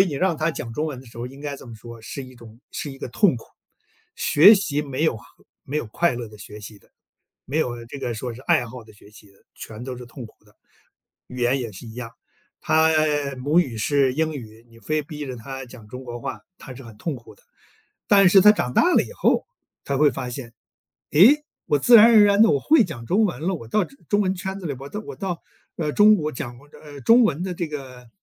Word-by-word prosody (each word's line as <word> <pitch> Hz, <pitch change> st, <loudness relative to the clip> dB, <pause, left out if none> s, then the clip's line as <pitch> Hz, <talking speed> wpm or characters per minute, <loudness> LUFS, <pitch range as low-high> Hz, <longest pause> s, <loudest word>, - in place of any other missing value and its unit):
以 195 Hz, -, +5 dB
你 150 Hz, -, -4 dB
让 175 Hz, +1 st, 0 dB
他 155 Hz, +2 st, 0 dB
讲 115 Hz, -7 st, -7 dB
中 155 Hz, +6 st, -2 dB
文 140 Hz, -5 st, -5 dB
的 130 Hz, -, -16 dB
时 115 Hz, -, -16 dB
候， 120 Hz, +1 st, -5 dB
应 135 Hz, +2 st, -12 dB
该 145 Hz, -1 st, -5 dB
这 -, -, -13 dB
么 115 Hz, -, -10 dB
说， 115 Hz, +1 st, -11 dB
是 135 Hz, +4 st, -7 dB
一 130 Hz, 0 st, -14 dB
种 115 Hz, 0 st, -15 dB
是 145 Hz, -, -5 dB
一 135 Hz, -, -13 dB
个 -, -, -6 dB
痛 170 Hz, -, +2 dB
苦。 115 Hz, -, -11 dB, 0.7 s
学 185 Hz, +9 st, +7 dB
习 165 Hz, -7 st, -1 dB
没 140 Hz, +1 st, -4 dB
有 125 Hz, -, +1 dB
和 -, -, -14 dB, 0.4 s
没 145 Hz, -, -5 dB
有 120 Hz, -, -4 dB
快 170 Hz, +7 st, 0 dB
乐 120 Hz, -2 st, -6 dB
的 105 Hz, -, -14 dB
学 105 Hz, +1 st, -11 dB
习 105 Hz, 0 st, -11 dB
的。 -, -, -29 dB, 0.6 s
没 150 Hz, +4 st, -1 dB
有 120 Hz, -5 st, -2 dB
这 140 Hz, +3 st, -9 dB
个 120 Hz, -, -3 dB
说 115 Hz, +1 st, -5 dB
是 125 Hz, -, -12 dB
爱 125 Hz, -2 st, +1 dB
好 120 Hz, +1 st, -10 dB
的 110 Hz, -, -17 dB
学 100 Hz, 0 st, -19 dB
习 105 Hz, -1 st, -17 dB
的， -, -, -25 dB, 0.2 s
全 110 Hz, +2 st, -9 dB
都 130 Hz, -2 st, -6 dB
是 125 Hz, -, -9 dB
痛 120 Hz, 0 st, -10 dB
苦 110 Hz, -, -24 dB
的。 105 Hz, -, -26 dB, 0.7 s
语 125 Hz, -, -10 dB
言 125 Hz, +2 st, +1 dB
也 115 Hz, -3 st, -5 dB
是 105 Hz, +5 st, -11 dB
一 110 Hz, -, -10 dB
样， 120 Hz, -2 st, -7 dB, 0.5 s
他 160 Hz, +1 st, +3 dB, 0.5 s
母 150 Hz, +7 st, +3 dB
语 125 Hz, -9 st, -3 dB
是 135 Hz, +3 st, +2 dB
英 160 Hz, +1 st, -1 dB
语， 115 Hz, -2 st, -11 dB
你 115 Hz, 0 st, -19 dB
非 155 Hz, +7 st, -1 dB
逼 150 Hz, 0 st, -7 dB
着 130 Hz, -2 st, -6 dB
他 135 Hz, +3 st, -8 dB
讲 120 Hz, -3 st, -14 dB
中 125 Hz, +4 st, -9 dB
国 120 Hz, -1 st, -7 dB
话， -, -, -6 dB, 0.2 s
他 130 Hz, -, -10 dB
是 135 Hz, -, -11 dB
很 115 Hz, -4 st, -13 dB
痛 160 Hz, +3 st, -4 dB
苦 120 Hz, -3 st, -13 dB
的。 -, -, -27 dB, 0.7 s
但 195 Hz, -2 st, +6 dB
是 190 Hz, +2 st, +7 dB
他 210 Hz, -, +8 dB
长 125 Hz, -12 st, 0 dB
大 350 Hz, -, +3 dB
了 -, -, +5 dB
以 -, -, -11 dB
后， -, -, +1 dB, 0.4 s
他 140 Hz, -, -2 dB
会 150 Hz, +1 st, +4 dB
发 130 Hz, -2 st, -5 dB
现， 120 Hz, -2 st, -8 dB, 0.6 s
诶， 255 Hz, -, +6 dB, 0.2 s
我 145 Hz, -, +2 dB
自 240 Hz, -, +4 dB
然 225 Hz, 0 st, +10 dB
而 220 Hz, -3 st, +7 dB
然 200 Hz, +1 st, +5 dB
地 -, -, +5 dB
我 145 Hz, -, +2 dB
会 305 Hz, -, +4 dB
讲 135 Hz, -, -7 dB
中 215 Hz, +5 st, +2 dB
文 170 Hz, -9 st, -2 dB
了， 185 Hz, +2 st, 0 dB
我 115 Hz, -9 st, -8 dB
到 205 Hz, -, +1 dB
中 275 Hz, -, -16 dB
中 205 Hz, 0 st, +2 dB
文 190 Hz, -1 st, 0 dB
圈 190 Hz, +1 st, -5 dB
子 185 Hz, -, -7 dB
里， 140 Hz, -, -3 dB
我 140 Hz, -, -8 dB
到 205 Hz, -, -6 dB
我 -, -, -7 dB
到， 180 Hz, -4 st, -4 dB, 0.4 s
呃， 150 Hz, -3 st, -2 dB
中 210 Hz, +1 st, +6 dB
国 155 Hz, -4 st, -3 dB
讲 120 Hz, -1 st, -7 dB
我 145 Hz, +2 st, -19 dB
这 -, -, -17 dB
呃， 145 Hz, -2 st, -11 dB
中 235 Hz, -, +6 dB
文 170 Hz, -5 st, 0 dB
的 185 Hz, -2 st, -4 dB
这 170 Hz, -2 st, -4 dB
个 130 Hz, -5 st, -9 dB
140 Hz, 275 characters per minute, -23 LUFS, 120-170 Hz, 0.7 s, 然